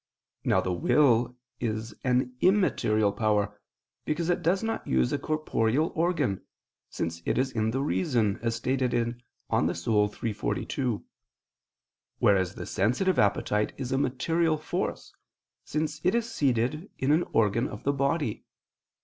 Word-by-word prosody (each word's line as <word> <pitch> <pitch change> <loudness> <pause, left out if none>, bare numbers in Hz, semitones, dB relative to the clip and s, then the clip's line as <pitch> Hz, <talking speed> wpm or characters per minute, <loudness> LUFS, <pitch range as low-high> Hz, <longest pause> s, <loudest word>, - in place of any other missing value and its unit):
Now - - +3
the 90 - -1
will 120 - +3 0.2
is 110 -1 -3
an 125 0 +1
immaterial 110 - +3
power, 105 -1 0 0.4
because 165 +3 0
it 175 - 0
does 180 +5 +1
not 225 0 -3
use 65 -1 +2
a - - 0
corporeal 155 -2 0
organ, 160 - 0 0.5
since 85 0 -4
it - - 0
is 130 +1 +1
in 110 -1 0
the 130 +4 -1
reason, 120 - +1
as 115 -1 -1
stated 125 +1 0
in 120 0 -1 0.3
De - - +3
Anima - - +2
iii, 105 +4 +2
text. 110 -2 -3
42: 125 -1 -2 1.1
whereas 95 -2 +2
the - - -6
sensitive 125 - +1
appetite 105 +1 +1
is 130 -2 -4
a 135 - +1
material 155 +5 +1
force, 150 - -4 0.5
since 150 0 -2
it 185 +5 +3
is 235 -1 0
seated 140 - 0
in 135 +2 +1
an 155 +3 +4
organ 115 +3 +2
of - - -9
the 140 - +1
body. 140 -3 -1
125 Hz, 150 wpm, -28 LUFS, 110-155 Hz, 1.1 s, an